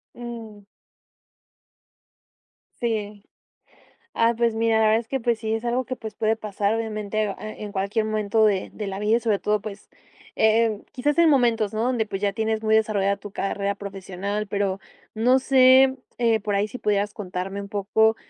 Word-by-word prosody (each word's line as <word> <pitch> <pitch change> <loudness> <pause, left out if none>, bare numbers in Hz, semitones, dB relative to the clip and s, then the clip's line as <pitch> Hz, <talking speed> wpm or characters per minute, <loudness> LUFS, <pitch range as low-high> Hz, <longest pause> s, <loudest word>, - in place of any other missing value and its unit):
Mm. 225 -4 -9 2.2
Sí. 210 -3 -2 0.9
Ah, 230 +1 +3
pues 235 -1 +2
mira, 225 0 +2
la 220 - +3
verdad, 220 +1 +4
es 230 - -9
que 270 - -2
pues, 235 -2 0
sí 220 0 -2
es 225 +2 -3
algo 245 +1 0
que 255 - -4
pues, 220 -3 -8
puede 220 0 +1
pasar 210 -1 -1
obviamente, 215 -1 -2
eh, 200 - -3
a 215 - -7
en 210 -1 -8
cualquier 200 +3 -1
momento 215 0 +1
de 195 -3 +1
de 210 -2 -6
la 195 0 -4
vida. 215 +3 +3
Y - - -2
sobre 220 -4 0
todo, 210 0 +1
pues, 205 -1 -9 0.5
eh, 220 +1 +4
em 215 -2 -3
quizás 290 +5 -1
en 335 -2 +6
momentos 230 -6 +2
¿no? 220 - -1
Donde 245 -3 +1
pues, 200 -2 -5
ya 200 -1 +1
tienes 220 +1 -1
muy 220 0 +3
desarrollada 205 -2 +1
tu 205 0 -10
carrera 200 0 -2
profesional. 200 +1 -5
Pero, 200 -1 -1 0.4
no 250 +4 +4
sé, 260 0 +6 0.2
eh, 230 -2 +3
por 205 0 -2
ahí 200 +1 +1
si 215 - -8
pudieras 205 -2 0
contarme 195 -1 -5
un 200 - -9
poco, 220 +2 +2
215 Hz, 185 wpm, -24 LUFS, 200-230 Hz, 2.2 s, en